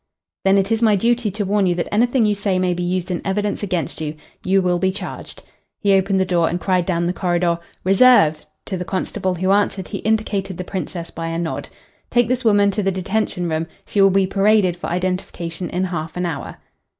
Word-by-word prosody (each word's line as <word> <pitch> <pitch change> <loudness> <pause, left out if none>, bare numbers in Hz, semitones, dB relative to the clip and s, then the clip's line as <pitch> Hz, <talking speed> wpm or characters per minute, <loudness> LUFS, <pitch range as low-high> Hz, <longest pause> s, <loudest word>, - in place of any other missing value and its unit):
"Then 195 +1 +5
it 195 +1 +1
is 225 0 +1
my 220 -3 +4
duty 235 +2 +1
to 205 +1 -3
warn 200 0 +2
you 175 - +1
that 170 - -3
anything 240 +2 +3
you 210 - +2
say 200 -2 -1
may 185 -1 +1
be 175 - -4
used 180 +1 -2
in 175 - -2
evidence 205 +1 -1
against 180 -7 -3
you. 155 0 -3 0.3
You 190 +1 +3
will 180 -2 +1
be 190 +1 +1
charged." 195 - -8 0.4
He 200 -2 +3
opened 195 0 +2
the 190 - +2
door 170 -3 +2
and 175 - -2
cried 185 -2 0
down 170 -2 0
the 175 - 0
corridor, 175 -2 0 0.2
"Reserve!" 190 -6 +5 0.2
To 190 - -3
the 180 - -3
constable 190 +1 -2
who 185 +2 0
answered 200 -2 +1
he - - -4
indicated 205 -4 -1
the 180 - -4
Princess 180 -2 -5
by 165 0 -5
a 165 0 -3
nod. 170 -1 -4 0.4
"Take 240 -1 +2
this 255 +1 0
woman 205 -3 +4
to 205 +2 -1
the 195 -1 +1
detention 190 -1 -2
room. 160 0 -1 0.2
She 205 - +1
will 195 - +7
be 195 0 +3
paraded 195 -1 +3
for 175 - -6
identification 175 -1 -3
in 180 +1 -1
half 170 -3 -4
an 180 - -1
hour." 170 -3 -5
190 Hz, 220 wpm, -20 LUFS, 175-205 Hz, 0.4 s, will